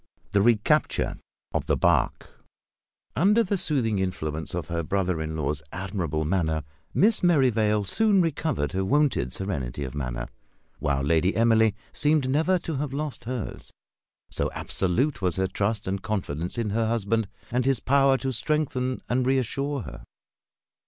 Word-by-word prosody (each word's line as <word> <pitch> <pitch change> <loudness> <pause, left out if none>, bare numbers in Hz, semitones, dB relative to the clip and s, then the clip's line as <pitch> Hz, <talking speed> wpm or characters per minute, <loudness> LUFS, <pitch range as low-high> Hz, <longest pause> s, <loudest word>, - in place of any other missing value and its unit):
THE 100 - +3
RECAPTURE 110 0 +2 0.4
OF - - -1
THE - - +2
BARQUE. - - +1 0.9
Under 210 - +4
the 200 0 -1
soothing 125 - +1
influence 80 -4 -3
of 90 - -4
her 85 0 -2
brother 90 -1 -1
in 80 0 -4
law's 75 -1 -2
admirable 85 -5 -3
manner, 80 -3 0 0.3
Miss 215 +2 +4
Merrivale 115 - +3
soon 205 - +2
recovered 155 - 0
her 95 +1 -1
wonted 135 - +1
serenity 70 -9 -2
of 65 - -5
manner; 60 -4 -3 0.5
while 70 -2 0
Lady 80 +6 +2
Emily 110 -2 +4 0.2
seemed 150 -2 +2
never 160 +7 +2
to 165 -4 -4
have 140 -1 -3
lost 150 -3 -4
hers, 125 -3 -5 0.6
so - - -1
absolute 120 - 0
was 90 -3 +1
her 95 - +1
trust 105 +2 -2
and 95 +1 -2
confidence 90 -3 -3
in 110 -3 -1
her 115 +1 +1
husband, 115 -1 0 0.2
and 125 +1 0
his 135 -3 +2
power 135 0 +3
to 130 0 -3
strengthen 130 -1 0
and 125 +1 0
reassure 135 +2 0
her. 60 -6 -10
110 Hz, 150 wpm, -26 LUFS, 85-135 Hz, 0.9 s, Under